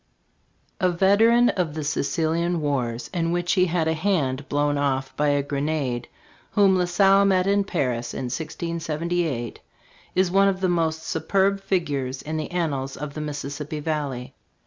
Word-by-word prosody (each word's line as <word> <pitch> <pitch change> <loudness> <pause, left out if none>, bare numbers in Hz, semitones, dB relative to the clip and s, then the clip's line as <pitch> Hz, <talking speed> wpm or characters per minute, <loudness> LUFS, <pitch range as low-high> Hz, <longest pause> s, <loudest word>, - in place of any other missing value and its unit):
A 185 - +3
veteran 215 +7 +4
of 170 -5 -1
the 155 - -3
Sicilian 165 +3 0
wars, 125 -6 -2
in 165 -1 0
which 175 0 0
he 185 -2 +4
had 165 -1 0
a 160 - +2
hand 150 -6 -1
blown 145 0 +1
off 135 -2 -1
by 150 - +1
a 145 -1 +2
grenade, 140 -4 -2 0.5
whom 195 -2 +5
La 180 -1 +2
Salle 195 +2 +4
met 190 -2 +3
in 200 +1 +3
Paris 125 -10 -2
in - - -5
1678, 160 -3 -3 0.6
is 185 -1 +2
one 195 +1 +5
of 190 -1 0
the 185 -1 +1
most 160 -2 0
superb 195 +5 +1
figures 145 -9 -2
in 155 +1 -3
the 155 - -3
annals 145 -7 -2
of 145 0 -6
the 155 - -5
Mississippi 150 +1 -5
valley. 145 -5 -3
160 Hz, 160 wpm, -24 LUFS, 145-180 Hz, 0.6 s, whom